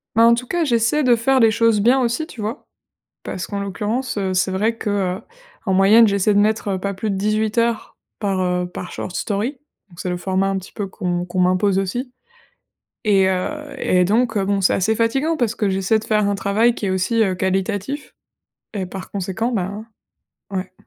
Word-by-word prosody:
Ben, 230 - +5
en 235 - +6
tout 245 +1 -2
cas, 345 +4 0
j'essaie 245 +2 +2
de 245 -2 +5
faire 260 +3 +2
les 225 -1 +6
choses 225 -2 +3
bien 250 +5 +4
aussi, 245 +6 0
tu 255 - -13
vois? 215 +2 -4 0.6
Parce 185 - -5
qu'en 200 -1 -4
l'occurrence, 210 +5 -2
heu, 190 -2 -1
c'est 185 +1 +1
vrai 215 +5 0
que, 215 -2 -3
heu, 190 -1 -1 0.4
en 195 - 0
moyenne, 205 +4 +6
j'essaie 200 0 +2
de - - +4
mettre, 215 +1 +1
heu, 190 - -1
pas 200 +1 -3
plus 200 +2 -3
de 195 - -1
18 215 +2 0
heures 230 -1 0 0.2
par, 200 -3 -1
heu, 180 0 0
par 180 0 -7
short 180 - -5
story. 210 +5 -1 0.4
Donc 170 -3 -19
c'est 180 - -3
le 180 - -2
format 190 +1 0
un 195 0 0
petit 185 - -11
peu 205 - -4
qu'on 175 -2 -3
qu'on 180 +1 -2
m'impose 185 +2 +2
aussi 245 +7 -3 0.9
et 195 -3 +4
heu 185 -1 0 0.3
et 180 0 +2
donc 225 +1 +1
heu, 195 - +1
bon, 200 -1 0
c'est - - +4
assez 215 +4 +1
fatigant 270 +9 +1
parce 235 -6 0
que 210 - 0
j'essaie 195 +3 +1
de 220 - -7
faire 215 -2 +1
un 200 - +1
travail 210 +4 +2
qui 210 - -4
est 190 - 0
aussi, 190 +5 +1
heu, 190 -3 +1
qualitatif 195 +9 -2 0.6
et 195 -3 -2
par 185 +1 -8
conséquent, 200 +5 -2
ben, 205 +1 -3 0.6
ouais. 190 -1 -4
205 Hz, 215 wpm, -20 LUFS, 190-230 Hz, 0.9 s, en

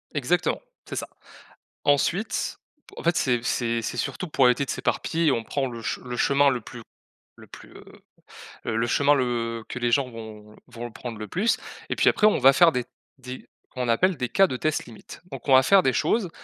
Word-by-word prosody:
Exactement, - - 0 0.3
c'est - - -6
ça. - - -4 0.8
Ensuite, 170 +9 0 0.4
en - - -7
fait, 170 +1 +2
c'est 120 -3 +1
c'est 115 -1 -1
c'est 115 - -4
surtout 185 - -3
pour 140 -4 +2
éviter 125 +3 +2
de - - -14
s'éparpiller, 165 -2 0
on 115 -3 -1
prend 135 +4 -2
le 120 -2 -7
che 115 - -2
le 125 -1 -5
chemin 140 +1 +4
le 125 -3 -1
plus - - -10 0.6
le - - -15
plus, - - -14
heu - - -13 0.8
heu, 110 - -2
le 115 +1 +1
chemin, 145 +4 +3
le 120 -4 -1
que 125 - -5
les 120 -1 0
gens 130 +1 +2
vont 110 -2 -11
vont 120 -1 -8
le 120 - -7
prendre 115 0 -7
le 105 -1 -7
plus 210 - +1 0.3
et - - -1
puis, - - +4
après, 210 - +4
on 215 - +2
va 135 +1 +7
faire 165 +4 +5
des 125 -1 -1 0.3
des 130 0 -9 0.2
comme 125 - -4
on - - -2
appelle, 175 +10 +2
des 125 - -2
cas 195 +9 +4
de 130 - -4
test 155 +4 -1
limite. 115 -2 -13
Donc, 135 -1 -8
on 135 - +4
va 130 0 +7
faire 195 +8 +6
des 130 -6 +1
choses 210 - +1
125 Hz, 220 wpm, -25 LUFS, 115-145 Hz, 0.8 s, va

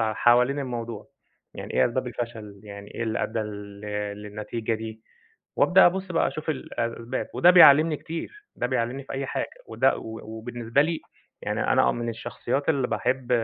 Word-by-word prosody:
ع 110 -1 +1
حوالين 125 +4 +4
الموضوع، 120 -5 -5 0.5
يعني - - -7
إيه - - +4
أسباب 125 +2 -2
الفشل، 115 -4 -6
يعني 100 0 -10
إيه - - -3
اللي 110 -1 -1
أدى 115 - -2
لل 105 -1 -6 0.4
للنتيجة 110 +2 -3
دي، 110 0 -7 0.5
وأبدأ 190 +1 +6
أبص 185 +1 -1
بقى 165 - +2
أشوف 155 - -7
الأسباب 120 -3 -3
وده 175 - +6
بيعلمني 160 -3 +8
كتير، 410 - -7
ده 125 - 0
بيعلمني 125 +2 -2
في - - -8
أي 135 0 -3
حاجة، - - -2 0.2
وده - - +2
و 110 0 -7
وبالنسبة 115 +3 -1
لي 160 +1 -2 0.4
يعني - - -2
أنا - - +4
آه - - +3
من 120 0 -3
الشخصيات 120 +4 -3
اللي 135 -6 +2
باحب 130 0 -1
120 Hz, 170 wpm, -26 LUFS, 110-140 Hz, 0.5 s, بيعلمني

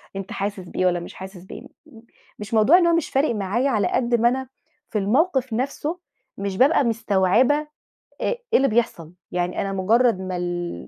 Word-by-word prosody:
أنت 195 -1 -6
حاسس 200 0 -3
بإيه 185 - -1
والّا 175 -1 +2
مش 170 - -9
حاسس 190 -1 -10
بإيه. - - -10
م - - -13 0.7
مش 210 +2 -8
موضوع 225 +11 +6
إن 345 -2 +3
هو 335 - +3
مش 335 - -1
فارق 270 -3 +1
معايا 210 +7 0
على 215 -6 +1
قد 240 -1 +1
ما 235 +1 +4
أنا 260 +1 -3 0.4
في 210 - -1
الموقف 260 - +1
نفْسه 285 +7 -3 0.4
مش 195 -1 -4
بابقى 280 +4 +4
مستوعبة 225 +3 +2
أ 300 0 -5 0.5
إيه - - -2
اللي 275 +1 +5
بيحصل، 215 -8 -1 0.2
يعني 180 0 -2
أنا 195 0 -3
مجرّد 220 +3 +2
ما 185 -1 -4
ال 175 - -4
220 Hz, 190 wpm, -22 LUFS, 190-265 Hz, 0.7 s, موضوع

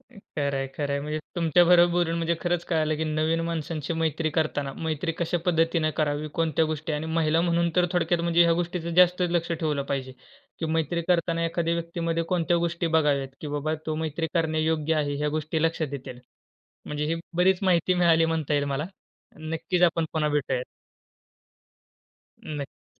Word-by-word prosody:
अ, - - -25 0.2
खरंय, 140 -2 0
खरंय 140 -1 -1
म्हणजे 150 +2 -3 0.2
तुमच्याबरोबर 175 +1 +5
बोलून 175 -1 +1
म्हणजे 170 0 0
खरंच 175 -1 -1
कळालं, 155 -2 0
की 160 - -2
नवीन 155 +2 0
माणसांची 160 -1 -3
मैत्री 160 -1 -1
करताना, 145 -3 -1
मैत्री 160 +1 -2
कशा 170 +1 0
पद्धतीने 165 -2 +2
करावी. 150 0 0
कोणत्या 160 -1 +1
गोष्टी 155 0 -3
आणि 150 +2 -2
महिला 160 0 +2
म्हणून 170 0 +1
तर 180 - +4
थोडक्यात 175 -1 +1
म्हणजे 170 0 +4
ह्या 170 - +4
गोष्टीच 175 -1 -2
जास्त 180 0 +5
लक्ष 170 -1 0
ठेवलं 155 -4 -1
पाहिजे, 130 -1 -3 0.5
की 160 - -2
मैत्री 160 +1 0
करतांना 170 -1 +1
एखाद्या 165 0 0
व्यक्तीमध्ये 170 0 -2
कोणत्या 175 -1 +2
गोष्टी 170 0 -1
बघाव्यात, 150 -4 +2
की 150 - -6
बाबा 150 +2 -1
तो 155 - -1
मैत्री 160 +2 -2
करण्यायोग्य 160 -1 +1
आहे 145 -2 0
ह्या 150 +1 0
गोष्टी 155 +1 -2
लक्षात 160 -3 0
येतील. 130 -2 -7 0.7
म्हणजे 150 0 -3
ही 165 - 0 0.2
बरीच 180 +1 +4
माहिती 180 -1 +3
मिळाली 165 -2 +4
म्हणता 160 -2 -1
येईल 145 - +2
मला. 140 +2 -2 0.5
नक्कीच 165 +3 -2
आपण 165 -1 +3
पुन्हा 150 -2 0
भेटूयात. 135 -3 0 1.8
नक्की. 145 -3 -7
160 Hz, 165 wpm, -26 LUFS, 150-170 Hz, 1.8 s, तुमच्याबरोबर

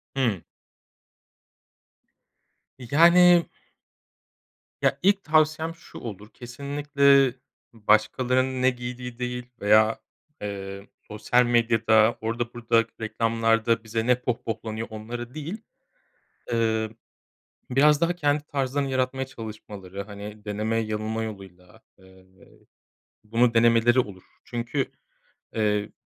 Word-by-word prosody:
Hıı. 115 -9 0 2.4
Yani 170 +7 +5 1.4
Ya, 140 - +1
ilk 200 +1 +3
tavsiyem 155 +1 +1
şu 165 - -13
olur, 105 -2 -8
kesinlikle 140 +1 +2 0.4
başkalarının 125 +4 +1
ne 130 - +5
giydiği 125 -1 -7
değil 125 0 -4 0.2
veya, 110 +2 +4 0.4
eee, 100 -1 -6 0.2
sosyal 115 +4 +2
medyada 115 -2 +3
orada 115 +2 -3
burada 115 -1 +2 0.2
reklamlarda 115 +1 +1
bize 115 +1 -3
ne 125 -1 +3
pohpohlanıyor 115 -2 -4
onları 120 +3 -7
değil. 160 +8 -6 0.9
Eee, 110 -1 +1 0.8
biraz 145 +3 +4
daha 170 +1 +2
kendi 145 -3 0
tarzlarını 140 -1 -2
yaratmaya 130 0 -1
çalışmaları, 105 -6 -8
hani, 105 +1 -10
deneme 105 +2 -2
yanılma 110 0 -2
yoluyla, 95 -1 -10 0.2
eee, 95 -1 -20 1.0
bunu 115 +2 +2
denemeleri 115 +2 +4
olur. 100 -6 -6 0.2
Çünkü, 120 +3 -3 0.7
eee, 105 -1 0
115 Hz, 95 wpm, -25 LUFS, 110-130 Hz, 2.4 s, Yani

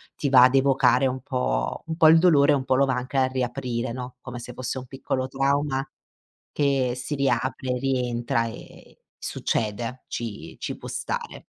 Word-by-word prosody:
ti 140 - -1
va 125 -2 +8
ad 130 +1 +5
evocare 135 -1 +4
un 130 0 -3
po' - - -1
un 160 - -3
po' 160 -2 +7
il 165 0 +7
dolore 150 -5 +5
e - - +5
un 130 - -1
po' 130 - +1
lo 140 +1 +4
va 130 - 0
anche 125 +2 -3
a 130 - +4
riaprire, 125 -2 -2
no. 125 0 -7
Come 125 -2 -7
se 120 - -8
fosse 130 +1 -4
un 130 - -6
piccolo 130 0 -3
trauma 135 0 0 0.7
che 135 -4 +1
si 125 +4 -4
riapre, 130 -2 0
rientra 120 -3 0
e 115 - -12 0.2
succede, 115 +3 -3
ci 115 -3 -6
ci - - -4
può - - -9
stare. - - -4
130 Hz, 180 wpm, -25 LUFS, 125-135 Hz, 0.7 s, va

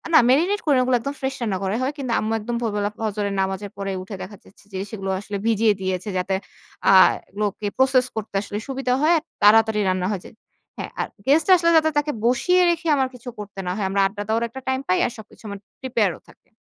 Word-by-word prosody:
না, - - +10
মেরিনেট 350 +10 +3
করে 290 - +4
না - - +4
ওগুলো, 250 0 +2
একদম 280 +3 -4
ফ্রেশ 265 0 -2
রান্না 210 -5 -1
করাই 195 +5 -1
হয়। 275 +3 -1
কিন্তু 260 -4 -4
আম্মু 220 +1 -2
একদম 235 +3 -4
ভোরবেলা 205 -2 -1
ফজরের 205 -2 -2
নামাজের 190 +1 -3
পরে 195 0 -3
উঠে 195 +1 -8
দেখা 205 0 -10
যাচ্ছে 200 - -21
যে, - - -3
সেগুলো 195 -3 -5
আসলে 200 0 -5
ভিজিয়ে 220 -1 +3
দিয়েছে, 185 +2 -2
যাতে 185 +1 0 0.5
আ - - +7 0.4
এগুলোকে 205 0 -3
প্রসেস 260 -1 +4
করতে 215 -2 -5
আসলে 205 0 -5
সুবিধা 265 -2 -1
হয়। 315 +3 +4
আর 310 - -4 0.2
তাড়াতাড়ি 215 +1 +5
রান্না 185 -1 0
হয়ে 190 -3 -3
যায়। - - -13 0.4
হ্যাঁ, - - -6
আর - - 0 0.2
গেস্ট 305 +3 +4
আসলে 335 -1 +3
যাতে 315 0 +4
তাকে 295 0 +1
বসিয়ে 360 +10 +3
রেখে 340 -1 -1
আমার 265 -1 +1
কিছু 245 0 -9
করতে 200 -1 -8
না - - 0
হয়। 205 -1 -2
আমরা 195 0 +1
আড্ডা 205 +1 -6
দেওয়ার 225 +2 +1
একটা 265 +3 -9
টাইম 260 0 +1
পাই, 185 - +2
আর - - -2
সবকিছু 220 +1 -14
আমার 200 -1 -6 0.2
প্রিপেয়ার 230 -7 +1
ও - - -21
থাকে। - - -22
220 Hz, 225 wpm, -22 LUFS, 200-265 Hz, 0.5 s, না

